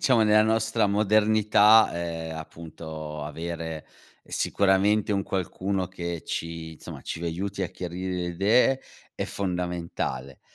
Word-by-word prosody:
diciamo 125 -4 +4
nella 110 0 +5
nostra 110 0 +2
modernità, 105 +1 +5
ehm, 80 -1 -4
appunto 80 -1 -7
avere 80 +1 -5 0.4
sicuramente 100 +2 +2
un 100 -1 +1
qualcuno 95 0 -2
che 85 -3 -5
ci, 85 -1 -5
insomma, - - -9
ci 85 - -5
aiuti 95 +4 -3
a 90 - -1
chiarire 90 +1 -5
le 90 -1 -2
idee 110 +9 +3 0.3
è - - -2
fondamentale. 90 -8 -3
90 Hz, 120 wpm, -26 LUFS, 85-105 Hz, 0.4 s, nella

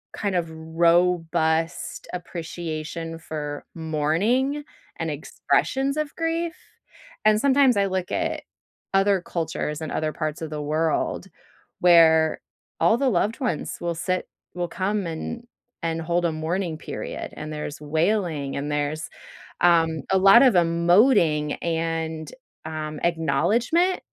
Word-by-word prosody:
kind 200 -3 -2
of 170 -2 0
robust 165 0 +1
appreciation 165 -2 -5
for 150 -3 -5
mourning 175 - 0 0.4
and - - -2
expressions 275 +2 0
of 305 -1 -3
grief. 330 +1 -1 0.7
And 215 0 +5
sometimes 275 -2 +4
I 200 0 +3
look 185 -1 -3
at - - -1 0.5
other 195 0 +3
cultures 160 -3 -3
and 155 - -4
other 155 -1 -1
parts 155 0 -3
of 160 - -4
the 150 -1 -4
world 155 +3 0 0.5
where 160 -2 +5 0.4
all 175 +8 +4
the 270 -1 +2
loved 210 - 0
ones 235 - -2
will 170 -1 -2
sit 185 +2 -2 0.3
will 175 -1 -2
come 195 +1 -1
and 230 +9 -5 0.4
and 165 0 -1
hold 175 +2 0
a 170 - +2
mourning 165 +1 -2
period. - - -6
And 155 0 -6
there's 150 0 -6
wailing, 160 -2 0
and 145 +1 -3
there's, 150 +2 -2 0.5
um, 165 -3 +4
a 190 - +4
lot 195 +5 +8
of 255 -6 +5
emoting 170 - +3
and, 160 -1 -2 0.3
um, 155 -1 -5
acknowledgment. 235 - +2
170 Hz, 125 wpm, -24 LUFS, 160-195 Hz, 0.7 s, lot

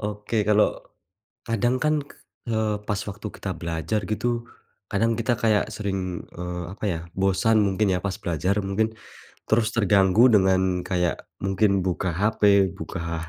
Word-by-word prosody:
Oke 105 +1 -4
kalo, 105 0 +5 0.9
kadang 115 +2 +1
kan, 155 0 +3
k - - -16 0.4
eee, 110 -1 +1
pas 105 -3 -1
waktu 105 +2 -6
kita 95 - -6
belajar 85 +5 -2
gitu, 110 +3 -1 0.6
kadang 115 +3 +1
kita 115 +1 +1
kayak 110 -1 +2
sering, 95 -4 -3
eee, 90 0 -5
apa 105 - -14
ya, 80 - -3 0.2
bosan 95 +4 +2
mungkin 100 +1 +1
ya - - -1
pas 100 - -1
belajar 90 +5 0
mungkin. 105 +3 -1 0.6
Terus 110 0 +3
terganggu 100 +2 +5
dengan 95 -2 +3
kayak, 90 -2 -1 0.2
mungkin 95 0 +2
buka 95 0 -1
HP, 100 0 +3
buka 85 0 -5
100 Hz, 145 wpm, -24 LUFS, 95-110 Hz, 0.9 s, kalo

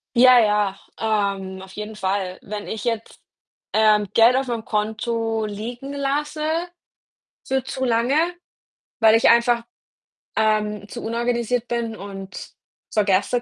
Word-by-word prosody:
Ja, 250 +1 +8
ja, 210 -3 +2 0.6
ähm, 190 -1 -8
auf 190 0 -12
jeden 210 +1 -6
Fall. 190 -2 -2
Wenn 205 0 -6
ich 220 -2 -5
jetzt, 230 -2 -3 0.5
ähm, 215 -1 +4
Geld 230 +2 +6
auf 265 0 0
meinem 230 -2 -3
Konto 225 +1 -1
liegen 235 +6 -6
lasse 290 +2 -2 1.0
für 265 -1 0
zu 260 - -3
lange, 240 +3 +2 0.8
weil 220 -1 +6
ich 225 - +5
einfach, 235 0 +4 0.7
ähm, 210 -2 +1
zu 240 - -7
unorganisiert 235 +1 -1
bin 235 -2 -2
und 195 -1 -8
es - - -9 0.4
vergesse 210 +3 +2
225 Hz, 130 wpm, -22 LUFS, 210-240 Hz, 1.0 s, Ja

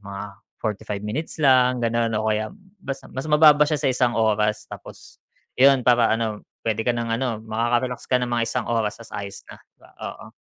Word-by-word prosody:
mga 100 -1 -7 0.4
45 105 -2 -4
minutes 135 +10 -4
lang 130 -3 +4
gano'n 115 0 +1
o 110 - -2
kaya 110 0 -1 0.3
bas 135 -4 -4 0.2
mas 135 +4 -4
mababa 150 -1 +7
siya 155 - +1
sa 135 - +1
1 125 -1 +1
oras. 105 -1 +1
Tapos - - -12 0.3
'yun 135 -1 +4
para 120 -2 +4
ano, 110 -2 -1 0.2
puwede 110 -1 0
ka 120 +1 0
ng 115 -1 -2
ano, 115 -2 -2
makaka-relax 120 +3 -1
ka 130 - +3
ng 120 - -5
mga 120 -1 +1
1 125 -2 -2
oras 110 -2 0
ta's - - -16
ayos 100 -1 -7
na, - - -14 0.4
oo. - - -8
115 Hz, 185 wpm, -23 LUFS, 110-130 Hz, 0.4 s, mababa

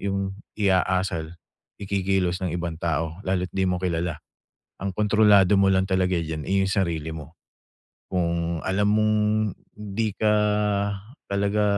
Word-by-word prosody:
yung 100 -1 -2 0.2
i-aasal, 90 -4 0 0.4
ikikilos 95 -2 -1
ng 90 -2 -2
ibang 85 -1 -4
tao 80 +1 -2
lalo't 90 -1 -1
di 95 -1 +1
mo 90 - +1
kilala. 85 -2 -2 0.6
Ang 95 -1 -4
kontrolado 105 -2 +4
mo 100 - +4
lang 95 +1 +1
talaga 95 -1 +2
diyan, 80 -3 -3
eh, 95 0 +2
yung 95 - 0
sarili 85 -5 -1
mo. 80 0 -9 0.7
Kung 85 -2 -1
alam 100 +2 +1
mong 110 +1 +3 0.6
'di 105 0 -3
ka 105 0 +2 0.9
talaga 100 +1 0
95 Hz, 135 wpm, -24 LUFS, 85-100 Hz, 0.9 s, kontrolado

